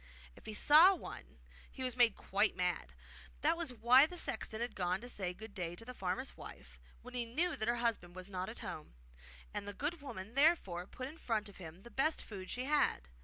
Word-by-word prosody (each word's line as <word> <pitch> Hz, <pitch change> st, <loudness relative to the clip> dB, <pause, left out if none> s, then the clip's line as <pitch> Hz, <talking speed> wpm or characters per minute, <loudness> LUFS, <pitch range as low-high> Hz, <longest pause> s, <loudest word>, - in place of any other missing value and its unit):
If -, -, -15 dB
he 215 Hz, -, -5 dB
saw 325 Hz, -, +8 dB
one -, -, -10 dB, 0.3 s
he 260 Hz, -, -7 dB
was 255 Hz, -2 st, -1 dB
made 240 Hz, -4 st, +5 dB
quite 205 Hz, +2 st, +1 dB
mad. 180 Hz, -1 st, -1 dB, 0.5 s
That 320 Hz, +3 st, +3 dB
was 335 Hz, -5 st, -2 dB
why 250 Hz, +4 st, +6 dB
the 355 Hz, -, -8 dB
sexton 220 Hz, -7 st, -1 dB
had 240 Hz, -1 st, -2 dB
gone 180 Hz, 0 st, 0 dB
to 245 Hz, -, -8 dB
say 190 Hz, -7 st, -2 dB
good 210 Hz, +3 st, -10 dB
day 175 Hz, -2 st, -4 dB
to 225 Hz, -, -10 dB
the 250 Hz, -, -7 dB
farmer's 190 Hz, +5 st, -3 dB
wife -, -, -11 dB, 0.2 s
when 250 Hz, -, -11 dB
he 245 Hz, -1 st, 0 dB
knew 310 Hz, +10 st, -1 dB
that 220 Hz, -4 st, -3 dB
her 235 Hz, -, +3 dB
husband 230 Hz, -7 st, -1 dB
was 185 Hz, 0 st, -7 dB
not 185 Hz, -2 st, -4 dB
at -, -, -9 dB
home, -, -, -7 dB, 0.6 s
and 200 Hz, -, -4 dB
the 205 Hz, -, -4 dB
good 300 Hz, -, -3 dB
woman 210 Hz, -6 st, -7 dB
therefore 260 Hz, -, +3 dB
put 255 Hz, +4 st, -6 dB
in 310 Hz, +4 st, -11 dB
front 215 Hz, -3 st, -1 dB
of 200 Hz, -, -14 dB
him 175 Hz, +1 st, -10 dB
the 235 Hz, -, -12 dB
best 310 Hz, +4 st, +1 dB
food 190 Hz, -4 st, -8 dB
she 250 Hz, +1 st, -3 dB
had. 285 Hz, -, +2 dB
230 Hz, 220 wpm, -35 LUFS, 190-270 Hz, 0.6 s, saw